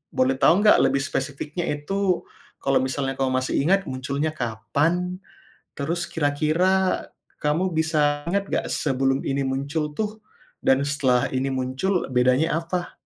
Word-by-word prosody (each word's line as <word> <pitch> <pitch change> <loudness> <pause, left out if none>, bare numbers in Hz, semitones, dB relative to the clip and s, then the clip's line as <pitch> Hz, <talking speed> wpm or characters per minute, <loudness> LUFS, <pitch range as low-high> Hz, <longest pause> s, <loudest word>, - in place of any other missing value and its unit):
boleh 130 +1 +3
tau - - +6
nggak 210 - +7
lebih 135 - +2
spesifiknya 145 +5 -3
itu 180 +5 -1 0.4
kalau 135 0 +3
misalnya 135 0 -2
kamu 135 -1 +1
masih 130 0 -1
ingat 195 +5 +3
munculnya 140 +4 -2
kapan, 155 - -1 0.6
terus 170 +4 -2
kira-kira 165 +5 +1 0.4
kamu 165 +5 0
bisa 155 -2 +1
ingat 200 +2 0
nggak - - 0
sebelum 135 -1 0
ini 140 0 0
muncul 140 +4 -2
tuh 215 0 -3 0.4
dan 135 - +4
setelah 130 -4 +2
ini 130 +1 0
muncul 130 +9 -1
bedanya 130 +5 +3
apa? 175 +1 -4
145 Hz, 135 wpm, -24 LUFS, 135-175 Hz, 0.6 s, nggak